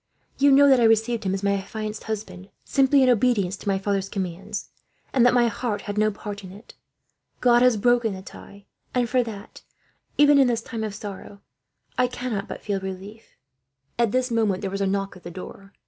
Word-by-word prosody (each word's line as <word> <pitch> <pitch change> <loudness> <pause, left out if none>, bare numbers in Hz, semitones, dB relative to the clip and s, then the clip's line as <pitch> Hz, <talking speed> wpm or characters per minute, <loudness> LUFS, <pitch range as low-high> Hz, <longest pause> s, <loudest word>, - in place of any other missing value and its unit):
You 280 0 +5
know 285 +1 +7
that 265 -2 +6
I 235 - +4
received 225 0 +2
him, 190 - 0
as 195 - -5
my 200 0 +2
affianced 215 +2 -5
husband, 200 -3 -6 0.2
simply 275 0 +4
in 255 - +4
obedience 220 -6 +2
to - - -12
my 195 -1 +2
father's 195 0 -1
commands; 195 +2 -5 0.4
and 255 - +4
that 245 - +4
my 240 -1 +4
heart 225 -3 -3
had 205 - -5
no 215 0 +3
part 205 0 -7
in 185 - -9
it. 205 +5 -14 0.7
God 240 -1 +4
has 250 -3 +4
broken 240 -1 +2
the 190 - -9
tie, 200 +1 -13 0.3
and 245 -1 +2
for 255 +2 +2
that, 220 -3 -8 0.6
even 290 -1 +6
in 270 - +5
this 235 -2 -1
time 225 -2 -5
of 210 -2 -4
sorrow, 200 -1 -9 0.6
I 250 - +4
cannot 245 -5 -4
but - - -8
feel 200 -2 -1
relief." 190 +4 -9 0.6
At 235 -3 +2
this 255 0 0
moment 215 -5 +1
there 195 - -2
was 195 0 -3
a 195 - +1
knock 195 0 -2
at 180 - -14
the 175 - -8
door. 195 +2 -10
215 Hz, 210 wpm, -24 LUFS, 195-240 Hz, 0.7 s, know